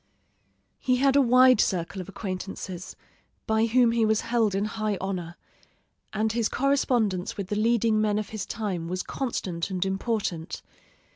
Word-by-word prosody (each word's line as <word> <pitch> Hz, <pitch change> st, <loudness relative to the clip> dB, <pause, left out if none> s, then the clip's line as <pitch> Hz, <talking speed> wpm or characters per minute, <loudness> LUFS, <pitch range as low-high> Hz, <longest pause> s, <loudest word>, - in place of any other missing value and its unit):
He 255 Hz, -, +2 dB
had 270 Hz, +1 st, +3 dB
a 280 Hz, -, +6 dB
wide 255 Hz, -1 st, +6 dB
circle 185 Hz, +1 st, -1 dB
of 185 Hz, -, -9 dB
acquaintances, 185 Hz, -2 st, -6 dB, 0.5 s
by 220 Hz, +1 st, +2 dB
whom 240 Hz, 0 st, +4 dB
he 230 Hz, -1 st, +2 dB
was 220 Hz, 0 st, +2 dB
held 230 Hz, -4 st, +1 dB
in 200 Hz, +1 st, 0 dB
high 215 Hz, -1 st, -2 dB
honor, 180 Hz, -3 st, -4 dB, 0.8 s
and 215 Hz, +1 st, 0 dB
his 230 Hz, -1 st, 0 dB
correspondence 245 Hz, -9 st, +1 dB
with 195 Hz, -2 st, -4 dB
the 210 Hz, -, -1 dB
leading 225 Hz, 0 st, +2 dB
men 210 Hz, -1 st, +1 dB
of 215 Hz, -2 st, -3 dB
his 215 Hz, -3 st, -5 dB
time 190 Hz, -7 st, -3 dB
was 185 Hz, +1 st, -3 dB
constant 190 Hz, -10 st, -3 dB
and 185 Hz, -1 st, -1 dB
important. 195 Hz, -4 st, -2 dB
215 Hz, 155 wpm, -26 LUFS, 190-230 Hz, 0.8 s, a